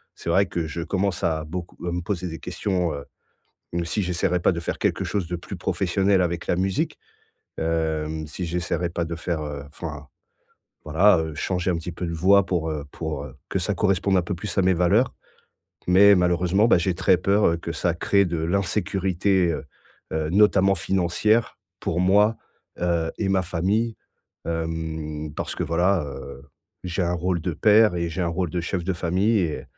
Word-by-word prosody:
c'est - - -6
vrai 95 +4 +4
que 85 -3 -3
je 80 +2 -5
commence 95 +2 -1
à 80 -3 0
beaucoup 85 +3 -7
à - - -1
me 90 - -2
poser 90 0 -3
des 80 - -7
questions, 90 -2 -1
heu, 70 -1 -6 0.7
hem, 85 0 0
si 105 - -1
j'essaierais 90 0 0
pas 85 - +3
de 85 - -3
faire 85 - -3
quelque - - 0
chose 100 -4 -2
de 90 - -2
plus 90 +3 -8
professionnel 95 +2 +1
avec 85 -1 -2
la - - +2
musique, 95 +1 -1 0.6
hem, 80 -1 -1
si 90 - -5
j'essaierais 85 0 -2
pas 85 0 -2
de 85 0 -4
faire, 80 -1 -3
heu, 75 -2 -5
enfin, 75 -2 -8 0.8
voilà, 90 +5 +4
heu, 80 -1 -4
changer 90 +3 -1
un - - -1
petit 85 - -5
peu 90 +2 -5
de 85 - -3
voie 95 +4 +4
pour, 80 -3 -1
heu 75 -2 -4
pour, 80 -3 -4
heu, 65 -3 -10 0.2
que - - 0
ça - - -1
corresponde 95 0 +2
un - - +2
peu 90 +2 -3
plus 90 0 -6
à 95 - +5
mes 95 - +4
valeurs. 95 +9 +3 0.8
Mais 100 +3 +7
malheureusement, 90 +4 +2
bah, - - +6
j'ai 90 +1 0
très 95 +1 +3
peur, 100 +3 +3
heu, 85 - +1
que 85 0 -5
ça 85 +1 0
crée 100 +4 +2
de 85 -1 -2
l'insécurité, 95 +1 +1
heu 70 -3 -5 0.5
heu, 80 -1 -1
notamment 100 0 +4
financière, 95 +6 +1 0.2
pour 85 - -1
moi, 105 +4 +4 0.4
heu 85 -2 0
et 100 - 0
ma 95 -1 +3
famille, 100 +6 0 0.5
hem, 80 -2 -4
parce - - -4
que - - -1
voilà, 85 +2 +2
heu, 70 0 -8 0.4
j'ai 90 +1 -1
un 85 0 0
rôle 90 0 -1
de 85 +2 -2
père 105 +2 +5
et 85 0 -1
j'ai 90 +3 -4
un 85 - 0
rôle 85 0 -2
de 90 - -2
chef 85 +1 -3
de 95 - 0
famille 95 +6 +1
et 80 -4 -2
90 Hz, 195 wpm, -24 LUFS, 80-95 Hz, 0.8 s, Mais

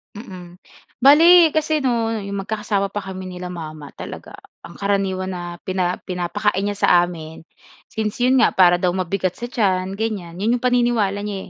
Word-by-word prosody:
Mm. 185 -5 -11 0.4
Bale 325 +5 +7
kasi 310 0 0
'no 235 -3 0
'yong 200 -2 -4
magkakasama 205 -2 -2
pa 205 - -3
kami 190 -1 -7
nila 180 -1 -7
mama 155 -4 -8
talaga, - - -9 0.2
ang - - -12
karaniwan 195 -2 -1
na 175 -1 -6
pina 185 -1 -1
pinapakain 180 +1 -1
niya 205 - -4
sa - - +3
amin, 160 -2 -6 0.5
since 215 +1 -4
'yon 255 +2 +4
nga - - +4
para 175 -2 +5
daw 180 0 0
mabigat 185 0 -2
sa 240 - -7
tiyan 195 -5 -1
ganyan, 200 -6 -4
'yon 215 +5 +1
'yong 245 - -1
paniniwala 240 -5 +1
niya 200 -2 -6
195 Hz, 165 wpm, -20 LUFS, 180-225 Hz, 0.5 s, Bale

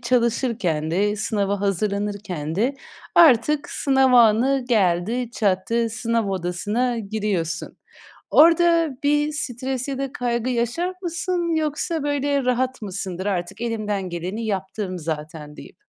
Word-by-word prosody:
çalışırken 235 - 0
de, 205 +5 +1
sınava 205 -2 -1
hazırlanırken 200 -4 -2
de 240 +9 +1 0.4
artık 300 -2 +5
sınav 265 -2 +2
anı 245 +3 +4
geldi 215 +3 +1
çattı, 230 +2 0
sınav 230 -1 -1
odasına 205 +7 -1
giriyorsun. 200 -6 -3 0.5
Orada 335 0 +5
bir 295 +1 +2
stres 260 -2 -3
ya 270 -1 -3
da 275 -1 -4
kaygı 240 0 -1
yaşar 250 +10 -1
mısın 345 -1 -1
yoksa, 310 0 -1
böyle, 285 -2 0
rahat 255 0 0
mısındır 190 -2 -5
"Artık 195 +2 -3
elimden 210 -5 -2
geleni 185 +7 -4
yaptım 190 -2 -3
zaten," 150 -1 -6
deyip. - - -13
230 Hz, 115 wpm, -22 LUFS, 195-265 Hz, 0.5 s, artık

